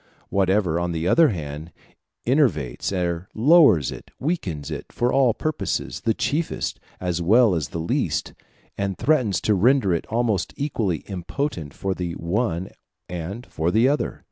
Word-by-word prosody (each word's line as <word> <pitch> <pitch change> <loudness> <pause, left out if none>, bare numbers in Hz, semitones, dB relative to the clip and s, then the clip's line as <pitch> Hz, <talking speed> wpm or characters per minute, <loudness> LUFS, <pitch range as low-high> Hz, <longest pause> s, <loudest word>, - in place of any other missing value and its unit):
Whatever, 95 -3 +2
on 85 0 -1
the 80 +1 -1
other 160 - +5
hand, 75 -3 -5 0.5
enervates 100 - +1
or 90 -1 -2
lowers 140 - +5
it, - - -10
weakens 90 - -3
it 75 - -5
for 120 +1 0
all 130 -5 +4
purposes, 155 -1 -2
the 115 -1 +1
chiefest, 160 +3 -2 0.2
as 90 -2 -2
well 110 +4 +5
as 80 -6 -1
the - - -5
least, 80 +1 -1 0.5
and 100 -2 -1
threatens 125 - +2
to 105 - +2
render 105 0 +3
it 85 - -2
almost 115 -4 0
equally 110 - -1
impotent 95 - -4
for 95 -1 -2
the 90 -2 -4
one 90 +1 -1 0.4
and 90 +7 -6
for 80 +2 -1
the 110 +7 +4
other. 145 +2 -1
95 Hz, 150 wpm, -23 LUFS, 85-125 Hz, 0.5 s, other